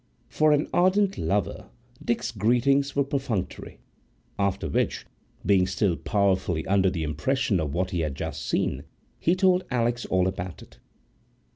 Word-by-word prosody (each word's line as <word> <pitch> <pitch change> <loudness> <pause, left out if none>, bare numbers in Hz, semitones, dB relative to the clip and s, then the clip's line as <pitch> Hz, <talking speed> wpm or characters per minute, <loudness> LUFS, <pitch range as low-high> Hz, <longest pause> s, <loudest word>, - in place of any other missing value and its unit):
For 155 0 +3
an 150 +1 +2
ardent 195 +2 +3
lover, 100 -3 -1 0.3
Dick's 120 - -1
greetings 125 +6 +2
were 140 - +3
perfunctory; 135 - -3 0.6
after 100 -1 0
which, - - -1 0.4
being 95 -2 +4
still 95 -3 +1
powerfully 95 -6 0
under 95 -1 +3
the 85 -3 -3
impression 105 - 0
of 75 -2 -2
what 90 +1 -1
he 90 - -1
had 75 -4 -2
just - - -5
seen, - - -1 0.4
he 170 - +2
told 185 -1 +3
Alix 120 -1 0
all 95 0 +2
about 90 -3 -5
it. - - -19
105 Hz, 145 wpm, -26 LUFS, 90-140 Hz, 0.6 s, being